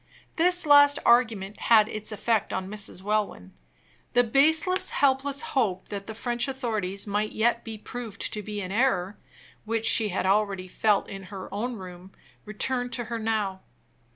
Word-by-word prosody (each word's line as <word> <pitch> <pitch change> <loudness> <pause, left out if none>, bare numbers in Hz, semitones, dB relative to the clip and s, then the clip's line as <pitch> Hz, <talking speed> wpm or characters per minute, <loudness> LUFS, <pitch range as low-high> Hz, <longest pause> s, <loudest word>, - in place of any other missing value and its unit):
This 355 +1 +2
last 285 -1 +7
argument 220 -5 +2
had 220 -2 +4
its 215 0 -5
effect 215 0 0
on 190 - -3
Miss 205 0 -3
Welwyn. 205 - -2 0.6
The 245 - +5
baseless, 315 +9 +3
helpless 280 +1 +1
hope 205 -9 0
that 200 -1 -6
the 220 - -6
French 240 +2 -2
authorities 220 -8 -2
might 210 +1 -2
yet 235 +1 +1
be 225 -1 -7
proved 225 -1 -5
to 210 - -3
be 210 0 -5
in 185 -1 -6
error, 205 -4 0 0.4
which 225 0 -2
she 220 -1 +5
had 185 0 -2
already 195 -1 +1
felt 210 +2 +1
in 195 -1 -8
her 190 0 -9
own 235 +4 -3
room, 185 -1 -11 0.3
returned 245 +4 -2
to 240 - -1
her 230 - -2
now. 215 -4 -2
215 Hz, 160 wpm, -26 LUFS, 200-245 Hz, 0.6 s, last